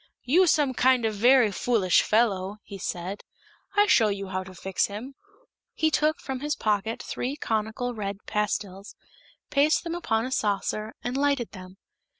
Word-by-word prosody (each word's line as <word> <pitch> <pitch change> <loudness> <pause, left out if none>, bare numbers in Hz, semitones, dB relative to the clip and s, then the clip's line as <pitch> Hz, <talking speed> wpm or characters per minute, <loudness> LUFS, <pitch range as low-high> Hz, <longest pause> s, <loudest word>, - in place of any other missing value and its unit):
"You 350 +9 +4
some 290 -4 +3
kind 255 -1 +3
of 220 - 0
very 240 +1 +5
foolish 200 -3 +2
fellow," 205 -3 +1
he 200 -2 -9
said. 185 +2 -4 0.5
"I 410 0 +5
show 230 - +4
you 200 -1 -3
how 185 0 -3
to 185 0 -12
fix 190 +1 -1
him!" 220 +7 -7 0.6
He 315 0 +1
took 305 +1 +1
from 265 -2 -5
his 295 +2 -2
pocket 215 +1 -1
three 260 +3 -3
conical 225 -1 -2
red 200 -2 -5
pastils, 205 -2 -3 0.6
placed 295 +2 +3
them 335 -1 -4
upon 225 -10 -1
a 260 - -5
saucer 215 -1 -1
and 245 +1 -3
lighted 280 -4 0
them. 185 -1 -11
220 Hz, 160 wpm, -26 LUFS, 200-265 Hz, 0.6 s, very